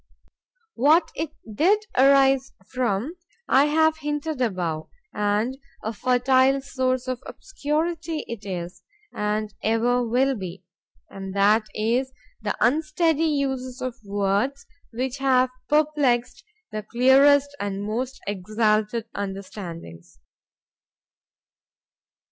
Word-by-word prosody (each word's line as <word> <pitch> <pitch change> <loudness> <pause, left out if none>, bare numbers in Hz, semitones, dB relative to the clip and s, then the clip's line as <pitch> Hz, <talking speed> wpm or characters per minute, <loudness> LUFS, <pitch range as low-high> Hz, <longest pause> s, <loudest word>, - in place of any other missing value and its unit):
What 300 +8 +4
it 320 0 -3 0.2
did 400 - +3
arise 270 0 +4 0.2
from, 250 - -1 0.3
I 275 +2 +5
have 315 +1 +3
hinted 295 -1 -3
above, 175 -9 -2 0.2
and 210 +5 0 0.2
a 220 - -3
fertile 255 +3 +3
source 260 -2 -1
of 255 -1 -3
obscurity 325 -5 -3
it 230 -3 -7
is,—and 210 - -5
ever 235 +3 +2
will 250 +3 +2
be,—and 190 0 -10
that 210 +2 +4
is 240 +5 0 0.3
the 210 -1 -2
unsteady 310 +5 +2
uses 265 -4 -2
of 255 -1 -3
words, 205 +7 -1 0.3
which 255 +3 -3
have 260 -2 +3 0.2
perplexed 295 -5 +1 0.3
the 215 - -3
clearest 270 +5 +4
and 200 0 -3
most 245 +5 -3
exalted 215 +3 0
understandings. 185 - -7
250 Hz, 95 wpm, -24 LUFS, 210-280 Hz, 0.3 s, I